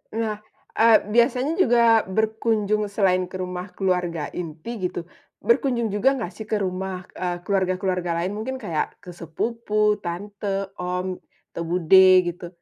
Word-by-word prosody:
Nah, 220 Hz, -2 st, -2 dB, 0.4 s
eee, 225 Hz, -1 st, +7 dB
biasanya 250 Hz, +6 st, +2 dB
juga 235 Hz, -, +5 dB
berkunjung 215 Hz, 0 st, 0 dB
selain 185 Hz, -3 st, +1 dB
ke 185 Hz, -, -11 dB
rumah 180 Hz, +1 st, -5 dB
keluarga 180 Hz, -5 st, -1 dB
inti 180 Hz, +5 st, -4 dB
gitu, 175 Hz, -, -6 dB, 0.4 s
berkunjung 245 Hz, -, +1 dB
juga 255 Hz, +7 st, +2 dB
nggak 220 Hz, -8 st, -4 dB
sih 220 Hz, -, -9 dB
ke 215 Hz, -, 0 dB
rumah, 185 Hz, 0 st, -3 dB
eee, 175 Hz, -1 st, -4 dB
keluarga-keluarga 185 Hz, -2 st, 0 dB
lain 190 Hz, -, -2 dB
mungkin 260 Hz, +5 st, -4 dB
kayak 175 Hz, -11 st, -3 dB
ke 180 Hz, -, -9 dB
sepupu, 210 Hz, +5 st, -1 dB
tante, 195 Hz, +2 st, -4 dB
om, 180 Hz, +1 st, -3 dB, 0.3 s
atau 170 Hz, -, -4 dB
bude, 180 Hz, +2 st, +6 dB, 0.2 s
gitu? 175 Hz, 0 st, -5 dB
195 Hz, 140 wpm, -23 LUFS, 180-220 Hz, 0.4 s, eee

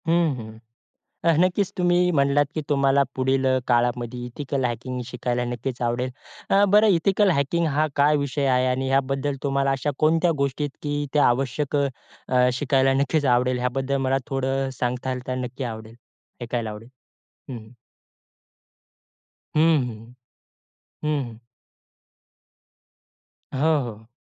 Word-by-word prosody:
हं, 165 Hz, -3 st, +2 dB
हं. 110 Hz, -2 st, -9 dB, 0.7 s
अ, 170 Hz, -, +5 dB
नक्कीच 185 Hz, +2 st, +2 dB
तुम्ही 180 Hz, 0 st, +3 dB
म्हणलात 140 Hz, -1 st, +3 dB
की 155 Hz, -, -1 dB
तुम्हाला 140 Hz, -1 st, +3 dB
पुढील 130 Hz, +1 st, +1 dB
अ, 130 Hz, 0 st, +3 dB
काळामध्ये 120 Hz, 0 st, 0 dB
एथिकल 135 Hz, +2 st, -3 dB
हॅकिंग 125 Hz, +1 st, -3 dB
शिकायला 125 Hz, -1 st, -2 dB
नक्कीच 120 Hz, +1 st, -4 dB
आवडेल. 120 Hz, +2 st, -1 dB, 0.4 s
अ, 200 Hz, +1 st, +5 dB
बरं 210 Hz, +3 st, +5 dB
एथिकल 195 Hz, +1 st, +3 dB
हॅकिंग 165 Hz, +2 st, +1 dB
हा 155 Hz, +1 st, +1 dB
काय 145 Hz, +1 st, +4 dB
विषय 140 Hz, 0 st, -1 dB
आहे 130 Hz, -1 st, +2 dB
आणि 130 Hz, +1 st, 0 dB
याबद्दल 135 Hz, +1 st, 0 dB
तुम्हाला 140 Hz, -1 st, +1 dB
अशा 135 Hz, +2 st, -1 dB
कोणत्या 165 Hz, +3 st, +3 dB
गोष्टी 140 Hz, +2 st, -1 dB
आहेत 145 Hz, -, -6 dB, 0.3 s
की 150 Hz, -, +1 dB
आवश्यक 135 Hz, +2 st, +1 dB
अ, 130 Hz, -2 st, -1 dB
शिकायला 135 Hz, +1 st, +2 dB
नक्कीच 150 Hz, +1 st, 0 dB
आवडेल, 125 Hz, +1 st, +1 dB
याबद्दल 130 Hz, +2 st, -1 dB
मला 135 Hz, +1 st, +2 dB
थोडं 135 Hz, 0 st, -1 dB
अ, -, -, -4 dB
सांगाल 125 Hz, +1 st, -2 dB
तर 130 Hz, -, -2 dB
नक्की 125 Hz, +2 st, -6 dB
आवडेल 110 Hz, +1 st, -11 dB, 0.5 s
ऐकायला 115 Hz, -2 st, -3 dB
आवडेल? 105 Hz, +2 st, -10 dB, 0.6 s
हं, 130 Hz, -, -5 dB
हं. 110 Hz, +1 st, -13 dB, 1.8 s
हं, 155 Hz, -, +4 dB, 0.3 s
हं. 115 Hz, +1 st, -10 dB, 0.9 s
हं, 150 Hz, -2 st, 0 dB
हं. 115 Hz, -1 st, -13 dB, 2.1 s
हो, 155 Hz, +3 st, +2 dB
हो. 110 Hz, -2 st, -9 dB
135 Hz, 135 wpm, -24 LUFS, 125-145 Hz, 2.1 s, अ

